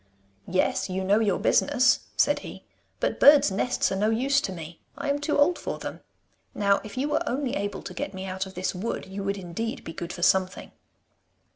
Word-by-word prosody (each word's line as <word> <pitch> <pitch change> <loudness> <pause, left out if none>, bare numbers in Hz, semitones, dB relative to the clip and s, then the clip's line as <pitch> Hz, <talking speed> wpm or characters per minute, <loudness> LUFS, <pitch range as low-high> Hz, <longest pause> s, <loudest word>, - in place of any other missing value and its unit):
'Yes; 185 +2 0
you 190 +1 -2
know 200 +3 +3
your 210 -4 +1
business,' 265 -3 +3 0.2
said - - +3
he, - - -10 0.3
'but - - -1
birds' 285 -7 +7
nests 250 +6 0
are - - 0
no 210 +3 +1
use 270 +5 +2
to 190 - -3
me. 170 -2 -9 0.2
I 285 - -1
am 285 - -1
too 290 +1 0
old 310 +5 +3
for - - -4
them. - - -7 0.6
Now 200 -1 +2
if 215 +3 -10
you 275 +3 0
were 300 - 0
only 265 0 -1
able 205 0 -3
to 180 - -7
get 190 - -4
me 190 -1 -7
out 190 0 -3
of 190 - -13
this 180 +1 -2
wood, 195 +5 -4
you 195 +1 -6
would 200 +1 -1
indeed 195 +5 -5
be 165 - -7
good 170 +1 -6
for 175 - -6
something. 185 0 +1
200 Hz, 215 wpm, -26 LUFS, 190-255 Hz, 0.6 s, birds